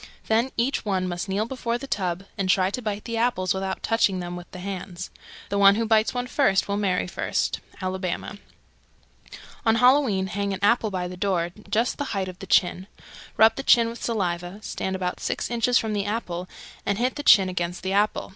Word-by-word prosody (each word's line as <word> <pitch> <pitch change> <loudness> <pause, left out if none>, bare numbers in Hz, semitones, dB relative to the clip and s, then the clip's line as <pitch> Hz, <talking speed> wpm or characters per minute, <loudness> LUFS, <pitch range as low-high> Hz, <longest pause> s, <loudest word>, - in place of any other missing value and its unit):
Then 230 +4 +2
each 245 +4 0
one 190 -3 0
must 175 +2 -4
kneel 200 +3 0
before 235 -1 -2
the 270 - -7
tub 185 -7 -2
and 190 -1 -2
try 185 +1 +3
to 250 - -3
bite 210 -2 -3
the 230 -1 -3
apples 225 -6 +1
without 190 0 -3
touching 210 -4 +2
them 175 0 -5
with 175 0 -9
the - - -10
hands. 185 -1 -6 0.4
The 200 - 0
one 200 0 +7
who 230 +1 0
bites 220 0 +3
one 245 -1 -2
first 250 -7 +2
will 200 - -1
marry 195 -3 0
first. 180 - -1 0.2
Alabama. 185 -1 -2 1.0
304. - - -13 0.2
On 225 - +5
Halloween 245 -5 +4
hang 200 0 -2
an - - -9
apple 225 +1 +3
by 185 -2 -3
the 180 0 -8
door 180 -3 0 0.2
just 230 +6 0
the 280 -8 -3
height 190 -1 -1
of 185 0 -9
the 195 - -8
chin. 185 +1 +2 0.5
Rub 220 +1 +7
the - - -2
chin 235 -4 +5
with 235 - -9
saliva, 180 -3 -2
stand 190 -3 -3
about 180 -1 -3
six - - -3
inches 240 +1 +3
from 220 -1 -1
the 200 -1 -1
apple, 185 -5 -3 0.3
and 200 0 0
hit 250 +3 +1
the 290 - -4
chin 200 -9 +6
against 180 -1 -3
the 190 0 -1
apple. 205 +2 +1
200 Hz, 210 wpm, -25 LUFS, 185-230 Hz, 1.0 s, one